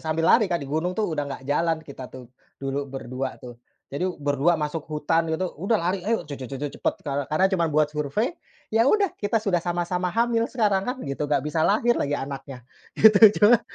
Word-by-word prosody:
sambil 160 +1 -1
lari 215 -5 +4
kan 175 - +1
di 145 - -6
gunung 160 +6 -2
tuh 210 -6 -1
udah 145 -2 -2
gak 135 -1 -7
jalan 160 +4 +1
kita 135 -2 -9
tuh, 130 -1 -11 0.3
dulu 140 +1 -4
berdua 130 0 -5
tuh. 120 -1 -12 0.3
Jadi 180 +7 -1
berdua 145 +4 +1
masuk 150 0 -4
hutan 160 +2 0
gitu, 170 +3 -2
udah 210 +4 +2
lari 185 +1 -1
ayo, 220 +5 -1
je 150 - -9
je 130 -3 -7
je 135 - -5
je 145 +2 -3
cepet - - 0
kare 140 -1 -2
karena 155 +5 +2
cuman 170 -3 +1
buat 150 0 +1
survei, 150 - -1 0.4
ya 230 +3 +4
udah 405 0 +2
kita 205 +2 0
sudah 195 -6 +1
sama-sama 175 +1 -1
hamil 230 +3 +1
sekarang 205 -5 0
kan 250 - -2
gitu, 140 +2 -3
gak 145 -1 +1
bisa 150 +1 -1
lahir 220 +7 +3
lagi 145 0 0
anaknya, 135 -2 -7 0.3
gitu, 215 -1 +6 0.2
cuman 220 +2 +6
160 Hz, 210 wpm, -24 LUFS, 140-195 Hz, 0.4 s, gitu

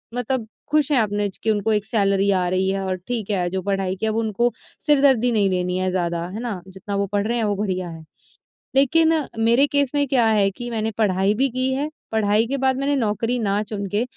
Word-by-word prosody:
मतलब 245 -1 -1 0.2
खुश 305 -1 +2
हैं 285 - +4
अपने 205 -1 0 0.2
कि 220 - +2
उनको 210 +1 0
एक 210 -1 0
सैलरी 200 -3 +1
आ 185 -2 +1
रही 185 +1 +1
है 195 0 -1
और 185 -1 -1
ठीक 225 -4 -3
है, 180 -3 0
जो 190 +1 -3
पढ़ाई 195 -1 -1
की 220 - -3
है 220 - +1
वो 225 - -1
उनको 230 +2 0 0.3
सिर 295 -2 +4
दर्दी 250 -3 +4
नहीं 205 -3 +2
लेनी 180 0 -1
है 185 0 0
ज़्यादा 170 -2 -1
है 210 +4 -6
ना 220 -7 -4
जितना 190 +2 -6
वो 200 0 +1
पढ़ 205 +1 -1
रहे 240 +1 0
हैं, 225 - 0
वो 205 -1 0
बढ़िया 185 -3 -2
है। 165 -1 -9 0.7
लेकिन 320 +4 +4 0.3
मेरे 235 +5 +4
केस 285 -2 +1
में 285 -1 +2
क्या 250 -3 +3
है 205 -3 +3
कि 240 +5 -7
मैंने 225 0 -1
पढ़ाई 195 -2 +2
भी 270 +5 +2
की 255 +2 -1
है, 290 +3 -2 0.2
पढ़ाई 215 0 +2
के 275 +3 -2
बाद 265 0 +1
मैंने 280 +1 0
नौकरी 230 0 0
ना 205 -1 0
चुन 205 -1 -5
के 210 +4 0
215 Hz, 235 wpm, -22 LUFS, 195-245 Hz, 0.7 s, हैं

